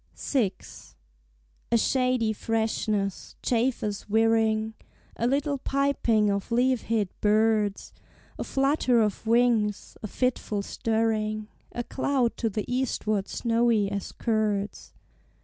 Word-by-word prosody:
VI. 240 -9 +1 1.2
A 235 - +5
shady 250 -2 +1
freshness, 215 -3 -2
chafers 230 -4 -1
whirring, 220 0 +2 0.4
A 235 - 0
little 280 +2 0
piping 255 -7 +1
of 200 +3 -3
leaf 250 +1 +2
hid 220 -4 0
birds; 215 -1 +2 0.5
A - - -1
flutter 270 -3 +2
of 215 0 0
wings, 225 -3 +2
a 215 - -4
fitful 215 -3 -1
stirring, 215 -1 -1 0.2
A 240 - -3
cloud 260 -2 0
to 225 - 0
the 210 0 -3
eastward 220 -5 -1
snowy 230 -3 +1
as 200 -1 -4
curds. 210 -3 -1
225 Hz, 110 wpm, -27 LUFS, 210-245 Hz, 1.2 s, A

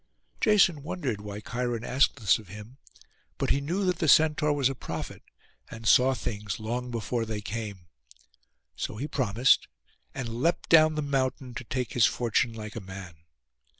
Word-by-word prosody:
Jason 195 - +4
wondered 140 - -3
why 105 0 -6
Cheiron 120 +1 -3
asked 130 +3 +2
this 110 -7 +2
of 105 - -14
him; 105 +8 -11 0.6
but - - 0
he 140 - +2
knew 180 +8 -1
that 180 -2 0
the 160 - 0
Centaur 150 0 +4
was 140 -3 +2
a 135 - -2
prophet, - - -6 0.5
and 115 -1 -7
saw 130 +5 +5
things 105 -5 -4
long 120 +3 -3
before 115 0 -2
they 110 -2 -4
came. 105 -3 -6 0.9
So 110 - -4
he 140 +6 -3
promised, 125 -3 +2 0.5
and 120 -2 -4
leapt 170 +4 0
down 155 -1 +6
the 150 - -1
mountain, 130 -2 -1
to 125 - -6
take 125 0 -3
his 120 -2 +5
fortune 120 0 0
like 110 -2 -8
a 115 - -5
man. 95 -2 -9
125 Hz, 170 wpm, -28 LUFS, 110-140 Hz, 0.9 s, down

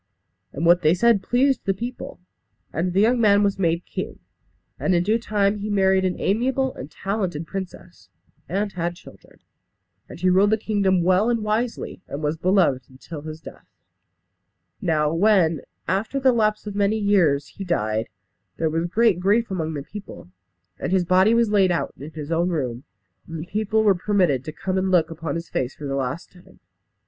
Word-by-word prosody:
And 155 +5 -3
what 175 +1 +5
they 155 +1 +4
said 230 +1 +3
pleased 265 +4 +1
the 195 - +1
people; 250 +4 -7 0.5
and 175 +4 -1
the 195 - +3
young 235 +2 +3
man 205 -2 +5
was 200 -1 0
made 170 -1 0
king. - - -5 0.6
And 185 - +1
in 170 - +2
due 215 +5 +1
time 210 -2 0
he 210 +1 -4
married 190 -2 +3
an 180 -1 -1
amiable 260 +5 0
and 130 - -9
talented 185 -2 -3
princess, 185 -1 -8 0.4
and 200 +2 -1
had 175 -1 -2
children. 175 - -17 0.7
And - - -10
he 185 - +1
ruled 190 +3 +4
the 220 - +3
kingdom 200 -4 +1
well 185 +5 +3
and 230 -2 0
wisely, 220 -1 -2
and 145 +2 -6
was 150 +1 0
beloved 165 -7 +2
till 155 0 -8
his 155 +1 -8
death. - - -12 1.1
Now 155 -5 +1
when, 170 -4 +3 0.3
after 205 +9 -1
the 260 -1 +4
lapse 215 -2 +1
of 205 - -5
many 205 +2 +1
years, 180 -10 +2
he 200 - -8
died, 110 - -1 0.5
there 160 -1 0
was 165 +2 -1
great 215 0 +2
grief 210 +4 +1
among 160 -4 -2
the 140 - -4
people, 200 - -10 0.5
and - - -3
his 185 -2 +2
body 185 +5 +4
was 230 -2 +2
laid 195 -3 +4
out 175 - -1
in 145 +3 -9
his 155 0 -7
own 170 +2 +1
room, 130 -7 -3 0.4
and 165 - -6
the 155 - -6
people 215 +3 0
were 205 -2 +5
permitted 180 -8 +1
to 155 - -5
come 185 +4 -2
and 190 0 0
look 170 -3 +2
upon 160 -3 -4
his 170 0 -5
face 130 0 -3
for 150 - -8
the 135 - -3
last 135 +4 -3
time. 180 -1 -19
185 Hz, 190 wpm, -23 LUFS, 165-210 Hz, 1.1 s, what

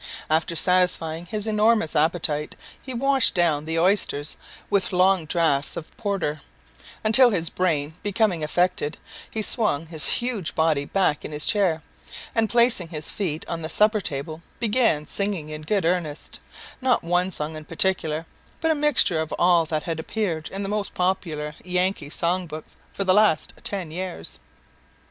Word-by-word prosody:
After 160 +2 +1
satisfying 175 -2 +1
his 215 +1 -3
enormous 215 -4 +2
appetite, 155 -1 0 0.3
he 260 - -8
washed 265 0 +3
down 160 -4 +2
the 160 +1 -2
oysters 165 -5 +1 0.3
with 200 -2 +1
long 185 -1 +3
draughts 155 -4 +1
of 160 - -8
porter, 195 -8 -2 0.6
until 230 +4 +7
his 170 -7 -1
brain 160 -5 0
becoming 205 -5 0
affected, 175 -1 0 0.3
he 220 - -2
swung 205 - 0
his 160 -3 -1
huge 240 -8 -2
body 155 -3 +2
back 180 -4 +1
in - - -6
his 150 0 0
chair, 180 -7 +2 0.5
and, 225 -1 +1
placing 235 -6 +3
his 155 -2 -6
feet 165 -6 -3
on 165 -1 -4
the 160 - -5
supper 210 +3 +3
table, 155 +1 -5 0.2
began 220 -9 +2
singing 195 -4 -2
in 155 0 -6
good 195 +4 0
earnest, 165 -4 -2 0.4
not 255 -1 +2
one 175 +2 +1
song 155 -3 -4
in 155 - -7
particular, 165 -1 -1 0.3
but 325 0 +2
a - - +5
mixture 295 - +3
of 160 - -5
all 175 -2 +4
that 155 -1 -2
had 165 -2 -3
appeared 165 -3 -3
in 195 +1 -5
the - - -3
most 205 0 -3
popular 165 -5 -1
Yankee 180 -4 -1
song 175 +3 -1
books 155 0 -9 0.2
for 195 - -2
the 185 -1 +3
last 210 -6 +3
ten 185 -6 -3
years. 180 - -5
175 Hz, 160 wpm, -24 LUFS, 155-205 Hz, 0.6 s, until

